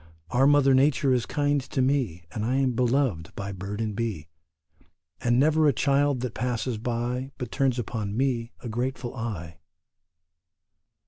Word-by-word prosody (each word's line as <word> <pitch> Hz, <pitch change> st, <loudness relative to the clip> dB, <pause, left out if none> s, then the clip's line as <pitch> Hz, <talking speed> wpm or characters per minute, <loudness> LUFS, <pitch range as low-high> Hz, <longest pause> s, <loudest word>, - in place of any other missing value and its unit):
Our 130 Hz, +3 st, +4 dB
mother 145 Hz, -2 st, +5 dB
Nature 135 Hz, 0 st, +3 dB
is 125 Hz, -2 st, 0 dB
kind 145 Hz, -1 st, +1 dB
to 130 Hz, -, -5 dB
me, 130 Hz, -, +1 dB
And 105 Hz, -, -3 dB
I 125 Hz, +4 st, 0 dB
am 135 Hz, -1 st, +2 dB
beloved 120 Hz, -, 0 dB
by 100 Hz, 0 st, -4 dB
bird 100 Hz, +2 st, -6 dB
and 110 Hz, -2 st, -2 dB
bee, 105 Hz, -9 st, -3 dB, 0.9 s
And 120 Hz, 0 st, +2 dB
never 155 Hz, +2 st, +4 dB
a 145 Hz, -, +4 dB
child 140 Hz, 0 st, +2 dB
that 125 Hz, -3 st, -3 dB
passes 125 Hz, -1 st, -2 dB
by 125 Hz, +3 st, -2 dB
But 125 Hz, -4 st, -5 dB
turns 135 Hz, -3 st, +1 dB
upon 110 Hz, -3 st, -3 dB
me 125 Hz, -3 st, 0 dB
a 125 Hz, -, -6 dB
grateful 120 Hz, +2 st, -3 dB
eye. 85 Hz, -9 st, -5 dB
125 Hz, 155 wpm, -26 LUFS, 110-135 Hz, 0.9 s, mother